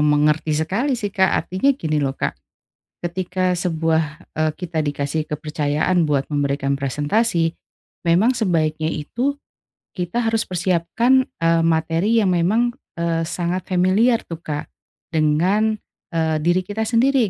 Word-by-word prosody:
mengerti 150 +1 +2
sekali 215 - 0
sih, 205 -4 -4
Kak, 190 -3 +3 0.2
artinya 190 +10 0
gini 155 - -1
loh, 135 -1 -1
Kak, - - -1 0.7
ketika 180 +1 -1
sebuah, 165 -2 +1 0.3
eee, 155 0 +1
kita 165 -4 -2
dikasih 145 +1 -2
kepercayaan 150 +3 0
buat 145 -3 0
memberikan 140 -1 0
presentasi, 160 - 0 0.5
memang 185 +10 +3
sebaiknya 160 -7 0
itu, 245 - -2 0.6
kita 180 +6 -1
harus 225 0 0
persiapkan, 185 +9 +2 0.2
eee, 165 0 +3
materi 165 +6 +2
yang 190 -3 +2
memang, 230 +8 +1 0.2
eee, 165 -1 0
sangat 175 +2 -2
familiar 200 +7 +3
tuh, 165 - -6
Kak 150 -3 -5 0.4
dengan, 175 +8 +2 0.4
eee, 160 -1 +1
diri 175 +3 +2
kita 205 +4 -3
sendiri 240 +1 +3
170 Hz, 130 wpm, -21 LUFS, 155-205 Hz, 0.7 s, Kak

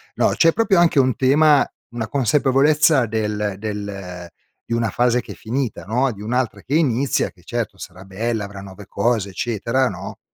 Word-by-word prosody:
No, - - +3
c'è 165 0 +4
proprio 220 -5 +2
anche 170 -4 +4
un 130 -3 +2
tema 145 +2 +4 0.2
una 115 -2 -4
consapevolezza 140 +1 +3
del 105 -2 -2
del 100 -4 -6 0.4
di - - -4
una 115 -1 0
fase 125 +2 +2
che - - -11
è - - -15
finita, 125 +1 -3
no, 125 +6 +1
di 100 - -12
un'altra 115 -2 -2
che 140 - -2
inizia 140 -4 +1
che 90 - -24
certo 115 -1 -4
sarà 95 +1 -10
bella, 110 +3 -3
avrà 100 0 -9
nuove 100 +1 -11
cose, 105 0 0
eccetera, 115 +5 -1
no, - - -8
115 Hz, 175 wpm, -21 LUFS, 100-135 Hz, 0.4 s, c'è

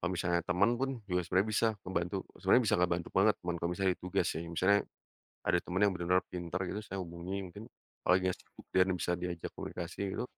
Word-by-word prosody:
Kalau 90 - 0
misalnya 85 -1 +1
teman 95 +6 +3
pun, 135 0 +1 0.2
juga 90 0 +2
sebenarnya 95 +5 +2
bisa 115 +2 +3 0.2
ngebantu 90 +1 -1 0.2
sebenarnya 100 +6 +5
bisa - - +4
ngebantu 85 -1 +1
banget 105 +3 +5
teman 90 - -1
kalau 85 +1 0
misalnya 95 0 +2
ada - - -9
tugas 90 - +1
sih, 85 - -4
misalnya 95 +5 +4 0.7
ada 85 0 +4
teman 95 +1 -3
yang 100 - +5
bener-bener 90 +1 +3
pinter 90 0 -4
gitu, 105 - -3
saya 100 - -5
hubungi 85 +2 -5
mungkin 100 +5 -9 0.4
apalagi 90 +1 +5
enggak 90 - -3
sibuk - - -16
dianya 95 0 +4
bisa 90 - -1
diajak 85 -2 -4
komunikasi 85 +1 -5 0.2
gitu, - - -1
90 Hz, 210 wpm, -33 LUFS, 85-95 Hz, 0.7 s, sebenarnya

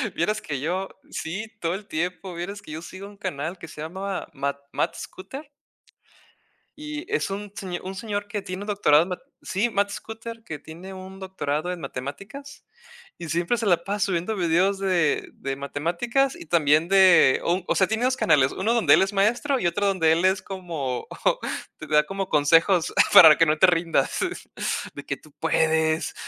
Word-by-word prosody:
Vieras 210 +6 0
que 145 -9 -4
yo 185 +6 -2 0.2
sí, 195 +7 -4
todo 165 +1 0
el 200 +1 -8
tiempo. 180 +2 -3
Vieras 195 +4 -5
que 155 - -12
yo 160 +1 -6
sigo 190 +3 -9
un 205 -1 -15
canal 175 -2 -4
que 165 - -10
se 150 - -10
llama 190 +4 -4
Ma 140 0 -2
Matt - - -1
Scooter 270 +11 -9 1.3
Y 300 +1 -6
es 455 - 0
un 200 +1 -5
señ 180 -3 -5
un 190 +1 -6
señor 205 -1 -4
que 210 -2 -4
tiene 185 +2 -6
un - - -9
doctorado 165 -7 +4
en 185 - -8
ma 180 - -3 0.2
sí, 205 +6 0
Matt 200 -2 +1
Scooter, 225 +2 -8
que 150 -7 -7
tiene 175 +4 -10
un 190 +1 -10
doctorado 180 -3 -3
en 180 - -5
matemáticas 165 - -8 0.5
y 170 -2 -7
siempre 170 +9 0
se 225 - -2
la 175 -4 +3
pasa 200 0 0
subiendo 180 +4 -1
videos 185 +2 +2
de 175 -6 +1
de 135 0 -4
matemáticas 175 - -1
y - - -10
también 155 0 +3
de 185 -8 +6
o 170 - +2
un 185 - -5
o - - +1
sea, 190 - +3
tiene 220 +2 -1
dos 255 0 +1
canales, 145 - +3
uno 215 +5 0
donde 235 - +5
él - - +3
es 195 +2 0
maestro 240 +8 +2
y 175 - +1
otro 200 +4 0
donde 175 -5 +3
él 170 +3 +1
es 190 +1 +2
como 165 -10 -5 0.7
te 155 - -9
da 150 0 +4
como 195 +2 -4
consejos 165 +4 +3 0.2
para 160 -3 +10
que 165 - +5
no 155 0 +2
te 190 - +6
rindas, 170 -1 +1 0.8
de 145 - -8
que 140 - -2
tú 155 - -20
puedes, 160 0 +1
185 Hz, 190 wpm, -24 LUFS, 160-200 Hz, 1.3 s, para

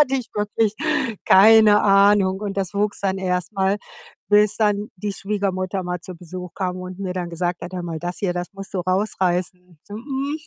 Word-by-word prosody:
hatte 270 -2 +3
ich 250 -3 -2
wirklich 210 +1 0 0.5
keine 210 +1 +7
Ahnung. 200 -1 +4
Und 200 -2 -4
das 195 0 -2
wuchs 205 0 -1
dann 195 -1 -1
erst 180 0 -2
mal, 195 0 +1 0.5
bis 210 0 +4
dann 210 -1 0
die 205 +2 -4
Schwiegermutter 195 -2 -2
mal 180 -1 -4
zu 185 - -9
Besuch 180 +1 -9
kam 185 -2 -2
und 185 0 -8
mir 185 -2 -4
dann 175 -2 -4
gesagt 175 +1 -3
hat: 180 - -7
„Hör 180 -1 -4
mal, 165 -2 -4
das 175 +2 -5
hier, 180 -3 -1
das 175 0 -4
musst 195 0 -10
du 185 - 0
rausreißen.“ 180 -2 -1
So: 205 - -10
„Mhm, 275 +5 -3
195 Hz, 195 wpm, -22 LUFS, 180-210 Hz, 0.5 s, keine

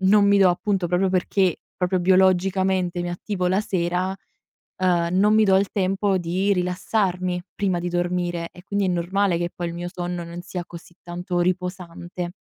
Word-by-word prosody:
non 200 +2 +5
mi 200 - +5
do 195 -2 +6
appunto 190 0 0
proprio 180 +2 +2
perché, 185 0 +1
proprio 180 0 0
biologicamente 185 0 +2
mi 175 - -3
attivo 180 +1 -3
la 190 +3 +2
sera, 180 0 -1 0.6
ehm, 175 -2 +1
non 210 +2 +4
mi 220 - +5
do 190 -1 +4
il 195 0 +1
tempo 195 0 +1
di 185 +4 0
rilassarmi 180 0 -1
prima 190 -3 0
di 175 +1 -3
dormire 175 -1 -1
e 180 - -15
quindi 200 -1 0
è - - 0
normale 180 +1 +1
che 175 0 -1
poi 175 -1 -3
il 170 - -6
mio 175 +1 -4
sonno 175 -1 -4
non 170 +1 -7
sia 180 -1 -5
così 170 0 -12
tanto 175 +1 -4
riposante. 180 -1 -3
180 Hz, 180 wpm, -23 LUFS, 175-190 Hz, 0.6 s, do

